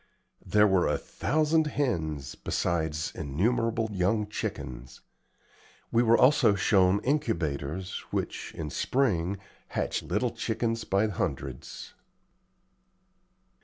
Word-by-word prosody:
There 105 0 +4
were 95 -3 +3
a - - +1
thousand 155 +1 +1
hens, 80 - -1
besides 80 -3 -1
innumerable 115 - 0
young 100 +3 +1
chickens. 65 -10 -6 0.9
We 115 - +4
were 115 -1 +5
also 130 -6 +5
shown 95 -1 +3
incubators, 90 - -1
which, - - -3
in 75 -2 -5
spring, 100 -8 0 0.3
hatch - - -2
little 110 +6 -1
chickens 115 0 -2
by 100 +3 +2
hundreds. 70 - -4
100 Hz, 95 wpm, -28 LUFS, 80-115 Hz, 0.9 s, were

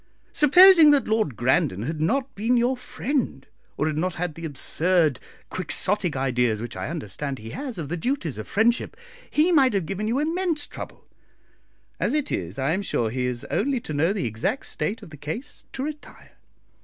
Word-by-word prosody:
Supposing 335 +2 +8
that 285 -2 +4
Lord 215 - 0
Grandon 115 -5 +1
had 155 +4 -4
not 265 - 0
been 230 +5 +1
your 245 +2 +2
friend, 250 - -3 0.3
or - - 0
had 155 -1 -1
not 185 +2 -1
had 175 -2 -3
the 165 +2 -8
absurd 160 +1 +1 0.3
Quixotic 185 0 +1
ideas 125 -4 +1
which 120 +2 -6
I - - -4
understand 140 - -4
he 115 0 -9
has 270 -6 -5
of 160 -4 -4
the 175 - -2
duties 170 - -2
of 110 - -7
friendship, 230 +3 +1 0.3
he 315 +4 +3
might 270 -7 +4
have 190 -4 0
given 195 +5 -3
you 235 +4 0
immense 325 0 0
trouble; - - -10 0.9
as - - 0
it 300 -2 -1
is, 90 +2 -3
I 135 +3 0
am 190 +4 0
sure 115 - -1
he 125 +1 -2
has 125 -1 -3
only 265 +3 0
to 155 - -6
know 160 +5 +2
the 200 -3 -2
exact 115 - -2
state 220 +2 -3
of - - -12
the 150 - -10
case 155 - -7
to 265 - -4
retire. 300 0 -8
185 Hz, 190 wpm, -24 LUFS, -, 0.9 s, Supposing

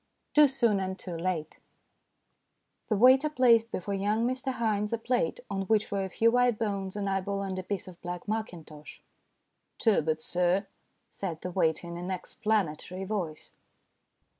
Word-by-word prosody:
TOO 300 -1 +7
SOON 235 -6 +2
AND 190 0 -3
TOO 180 -3 -6
LATE 165 -2 -3 1.3
THE 215 - +2
waiter 260 +6 +6
placed 235 -5 +4
before 200 +2 -3
young 205 +4 +1
Mr 260 +1 -2
Haynes 215 -3 0
a 230 - +1
plate 235 -6 -1
on 195 -2 -3
which 215 -1 +2
were 200 -1 0
a 190 - -4
few 230 +5 +3
white 245 -2 +3
bones, 200 -3 -2
an 205 -1 -2
eyeball, 195 +1 -1
and 190 -1 -3
a - - -2
piece 190 +1 -4
of 180 -2 -12
black 175 +1 -6
mackintosh. 175 -9 -6 0.4
" - - -50
Turbot, 160 -8 +2
sir," 180 +3 +1 0.5
said 170 -5 -5
the 180 - -4
waiter, 165 -2 +1
in 170 0 -6
an 175 +1 -5
explanatory 185 -1 -2
voice. 185 -6 -4
195 Hz, 165 wpm, -29 LUFS, 180-225 Hz, 1.3 s, TOO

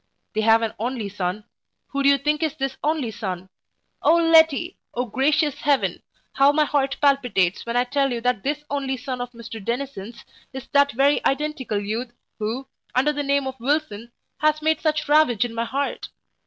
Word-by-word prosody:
They 220 - 0
have 225 +1 +4
an 225 - -2
only 235 -2 -3
son 195 +1 -3 0.5
who 280 - -2
do 280 - +5
you 280 - +5
think 300 +3 0
is 315 -2 -1
this 270 -3 -3
only 300 -6 0
son? 190 -4 -5 0.5
O 330 - +5
Letty! 330 0 +4 0.2
O 245 +1 0
gracious 280 +5 +1
heaven! 280 +2 +1 0.3
how 275 +1 +5
my 305 +1 +2
heart 275 -2 0
palpitates, 245 -11 +2
when 235 +1 -1
I 245 - +4
tell 275 +2 0
you 240 - -2
that 250 -3 0
this 295 +4 -2
only 270 -2 -1
son 255 -1 -5
of 245 - -4
Mr 230 -2 -9
Dennison's, 235 -2 -5 0.3
is 265 0 -7
that 285 0 +4
very 275 +4 +3
identical 275 -5 -2
youth 225 +4 -4 0.3
who, 225 +5 -3 0.3
under 280 +4 +3
the 290 - -2
name 280 -1 +1
of 265 -1 -5
Wilson, 240 -4 -2 0.3
has 305 0 +2
made 315 0 +1
such 305 -1 0
ravage 290 -7 +4
in 235 - -6
my 230 0 -2
heart! 275 +4 -3
265 Hz, 185 wpm, -23 LUFS, 230-290 Hz, 0.5 s, do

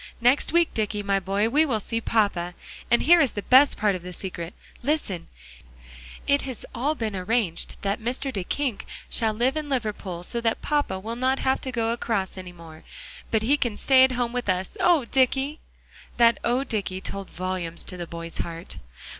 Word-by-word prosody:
Next 245 +4 +3
week, 340 0 +3
Dicky, 210 -1 -1
my 200 -1 +1
boy, 195 +3 0
we 295 +7 +4
will 250 -8 0
see 230 +2 -3
papa. 185 -6 0 0.3
And 235 - +4
here 340 +2 +7
is 275 -7 +2
the 205 - -4
best 265 +3 +6
part 210 -1 +2
of 185 - -4
the 180 +1 -8
secret. 175 -2 -6 0.3
Listen; 240 - -1 1.0
it 280 0 +3
has 260 -4 -5
all 275 +6 0
been 220 -6 -3
arranged 190 -2 -1
that 200 +2 -1
Mr. 255 +4 -2
Duyckink 220 +5 -2 0.3
shall 225 -2 +2
live 240 +6 +1
in 305 -1 -3
Liverpool, 210 -9 -3
so 235 +6 -3
that 225 -1 0
papa 290 -10 0
will 225 +4 -5
not 260 +2 +1
have 265 0 +1
to 260 - -4
go 230 -2 0
across 225 -5 -2
any 185 -1 -8
more, 165 -2 -13 0.5
but 220 -1 +1
he 280 +6 +3
can 240 -7 -1
stay 260 -1 +6
at 260 0 +4
home 240 -1 -1
with 245 -4 -2
us. 185 - -1
Oh, 345 -7 +4
Dicky!" 270 +4 +1 0.6
That 235 -1 +5
"Oh, 245 +3 +1
Dicky!" 205 -7 -2
told 195 0 -6
volumes 180 -2 -2
to 185 - -4
the 175 -1 -6
boy's 170 0 -7
heart. 165 0 -5
225 Hz, 190 wpm, -25 LUFS, 190-260 Hz, 1.0 s, here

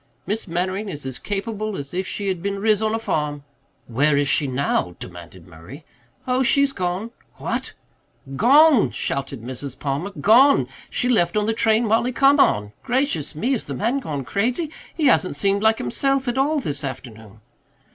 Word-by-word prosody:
Miss 215 +1 -3
Mannering 185 +4 -2
is 145 -6 -6
as 130 -2 -5
capable 210 0 -4
as 140 +2 -7
if 185 +1 -2
she 205 - -4
had 185 -3 -2
been 200 +1 -2
riz 215 +1 +2
on 220 0 0
a - - 0
farm." 150 -9 -2 0.4
"Where 140 +5 +2
is 145 0 +1
she 145 - +2
now?" 125 -9 -1
demanded 85 0 -10
Murray. 90 - -13 0.4
"Oh, 255 +1 +1
she's 280 +1 +3
gone." 185 +4 -3 0.2
"What?" - - -4 0.6
"Gone," 280 - +5
shouted 135 -3 -4
Mrs. 130 +2 -7
Palmer, 145 +7 -3
"gone. 260 +7 +5 0.2
She 245 - -1
left 195 -6 +2
on 210 - +1
the 225 - 0
train 225 +1 +2
Mollie 230 +4 +1
come 275 +3 +4
on. 105 - +3
Gracious 245 - -1
me, 230 - -1
has 255 - -1
the - - -5
man 235 +6 0
gone 145 - -5
crazy? 250 - -1 0.2
He 315 - 0
hasn't 185 - +3
seemed 200 +6 +1
like 220 0 +3
himself 270 - -1
at 245 - 0
all 290 +3 +1
this 145 - -4
afternoon." 110 -5 -8
195 Hz, 175 wpm, -22 LUFS, -, 0.6 s, Gone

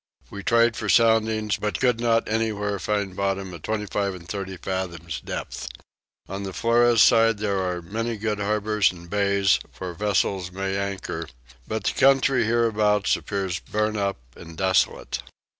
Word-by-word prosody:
We 100 - -6
tried 115 +2 +3
for 105 - -4
soundings 110 -2 +3
but 105 0 -2
could 125 -3 +2
not 115 -1 +2
anywhere 105 -2 -1
find 100 -1 -2
bottom 95 -1 -2
at 85 - -9
25 105 -1 -2
and 85 -2 -12
30 95 -1 -5
fathoms 85 -3 -4
depth. - - -5 0.6
On 95 +1 -5
the 95 -1 -5
Flores 115 0 +4
side 115 -1 +5
there 100 -2 -1
are 90 -2 -2
many 115 +5 -3
good 105 0 -2
harbours 105 0 +1
and 85 -1 -12
bays 100 0 +2 0.2
where 90 -1 -5
vessels 95 -1 0
may 95 +1 -3
anchor; 100 -4 -3 0.4
but 110 -2 -3
the - - 0
country 135 -2 +4
hereabouts 110 -3 +2
appears 95 -4 -3
burnt 105 +4 -1
up 100 -1 -1 0.2
and 80 -1 -12
desolate. 95 0 +1
100 Hz, 155 wpm, -24 LUFS, 95-110 Hz, 0.6 s, side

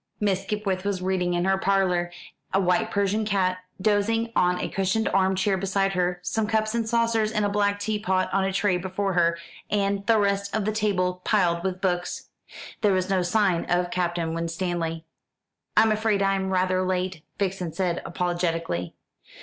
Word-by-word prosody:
Miss 195 -3 +1
Skipwith 195 -2 -2
was 200 -2 -1
reading 180 -1 0
in 175 +1 0
her 190 0 +2
parlour, 185 -3 +1 0.4
a 190 - +2
white 180 -2 +2
Persian 200 +2 0
cat 190 -3 0 0.2
dozing 220 +3 +1
on 180 0 +2
a - - -2
cushioned 195 +4 0
arm 190 0 +2
chair 190 0 +1
beside 195 +1 0
her, 180 -1 0
some 210 +4 -1
cups 215 0 0
and 230 -1 -1
saucers 230 -2 +2
and 210 -2 0
a - - +1
black 205 0 +1
teapot 205 -3 0
on 195 0 +2
a 195 - 0
tray 190 -1 +1
before 190 +2 -2
her, 170 -1 +2 0.3
and 200 -1 0
the 225 -1 +5
rest 200 -1 0
of 215 -2 0
the 215 - +1
table 185 -4 0
piled 175 -5 +2
with 185 -1 -3
books. 180 -2 -2 0.5
There 205 -3 +3
was 185 0 0
no 190 -1 +2
sign 180 -1 +1
of 175 0 0
Captain 175 -2 -1
Winstanley. 165 -1 -3 0.7
"I'm 220 - +6
afraid 215 -2 +1
I'm 195 -1 +1
rather 185 0 +1
late," 185 -2 -2 0.2
Vixen 190 -3 -2
said 180 0 -1
apologetically. 170 - -2
190 Hz, 175 wpm, -25 LUFS, 180-205 Hz, 0.7 s, I'm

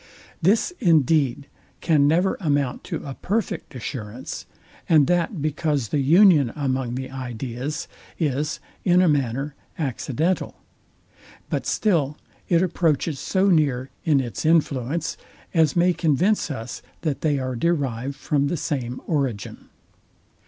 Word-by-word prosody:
This, 210 - +3
indeed, 150 -4 +3 0.3
can 150 -4 +3
never 175 +5 +2
amount 145 -7 0
to - - -5
a 140 - -5
perfect 195 -3 -3
assurance; 120 -1 -6 0.4
and 155 -4 +6
that 175 0 0
because 150 -5 0
the 150 - 0
union 155 - +5
among 130 -4 -1
the 130 0 -5
ideas 130 +3 -4 0.3
is, 150 -2 -1 0.2
in 180 0 +4
a - - +4
manner, 140 -1 0 0.2
accidental: 150 - -1 1.0
But - - -1
still 155 -9 +1 0.3
it 170 0 +4
approaches 165 -4 0
so 195 +1 +1
near, 140 -7 +2
in 150 -4 +3
its 120 -6 -4
influence, 155 -2 +1 0.4
as 160 -4 +3
may 175 +1 +4
convince 170 +6 +1
us, 115 -4 -6 0.2
that 150 -4 -2
they 150 -3 +2
are 130 -1 -3
derived 135 -3 -1
from 140 0 0
the 170 - -1
same 130 -6 -3
origin. 135 -10 -2
145 Hz, 125 wpm, -23 LUFS, 130-165 Hz, 1.0 s, and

